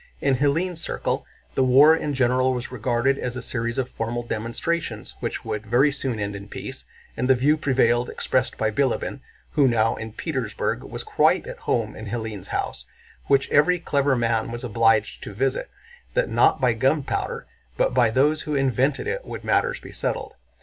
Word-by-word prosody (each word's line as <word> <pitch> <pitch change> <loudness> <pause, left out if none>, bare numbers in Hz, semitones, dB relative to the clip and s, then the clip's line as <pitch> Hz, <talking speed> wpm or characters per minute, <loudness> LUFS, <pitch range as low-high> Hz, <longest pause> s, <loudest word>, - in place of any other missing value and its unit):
In 135 -2 +2
Hélène's 165 +5 0
circle - - -2 0.3
the 130 - +2
war 140 +5 +7
in 150 -3 -2
general 130 0 +2
was 125 0 -5
regarded 125 +3 0
as 125 0 -3
a 125 - -4
series 115 -2 -3
of 130 -2 0
formal 120 +1 -3
demonstrations 120 +9 -3
which - - -4
would 105 +1 -4
very 130 +6 +4
soon 130 -5 -3
end 100 -1 -3
in 100 0 -8
peace, - - -8 0.3
and 125 +2 -1
the 130 - +7
view 140 +5 +3
prevailed 125 -4 +2
expressed 130 0 -1
by 110 0 +1
Bilíbin—who 135 +3 -1
now 115 -2 +2
in 110 0 -6
Petersburg 125 -6 -2
was - - -7
quite - - +2
at - - -8
home 110 -2 0
in 110 - -8
Hélène's 110 -3 -5
house, - - -3 0.4
which 140 -1 +3
every 155 +5 +4
clever 140 -4 +1
man 115 -2 0
was 120 +1 -5
obliged 115 -2 +2
to 105 - -7
visit—that 445 - -3
not - - +4
by - - +3
gunpowder 475 0 -1 0.3
but - - +2
by 115 - +4
those 145 +7 +2
who 150 - -3
invented 135 +1 +1
it 480 +3 -2
would - - -7
matters - - +1
be - - -11
settled. - - -3
130 Hz, 175 wpm, -24 LUFS, 115-145 Hz, 0.4 s, war